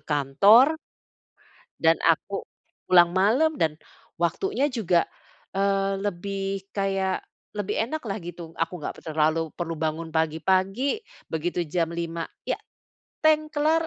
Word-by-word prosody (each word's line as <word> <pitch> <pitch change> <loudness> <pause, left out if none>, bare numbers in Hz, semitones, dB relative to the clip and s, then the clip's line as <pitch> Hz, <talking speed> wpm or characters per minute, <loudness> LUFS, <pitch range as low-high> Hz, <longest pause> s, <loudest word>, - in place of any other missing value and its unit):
kantor 200 - +5 1.0
dan 165 0 +5
aku 170 +4 +1 0.5
pulang 175 -1 +7
malam, 260 +12 +3
dan 155 -1 0 0.4
waktunya 280 - +1
juga, 185 -9 +1 0.5
eee, 195 0 +1
lebih 195 0 -3
kayak 195 -1 0 0.3
lebih 205 0 -2
enak 310 +5 -4
lah, 200 0 -2
gitu. 170 -1 -8
Aku 165 0 -2
nggak - - -5
pe - - -13
terlalu 160 +1 +1
perlu 165 -2 -4
bangun 160 +1 -2
pagi-pagi, 190 - +1 0.3
begitu 175 +2 -1
jam 165 +1 0
5.00, 170 0 -3 0.2
ya, - - -1 0.7
teng 310 0 +3
kelar, 315 +2 +2
185 Hz, 120 wpm, -25 LUFS, 165-210 Hz, 1.0 s, pulang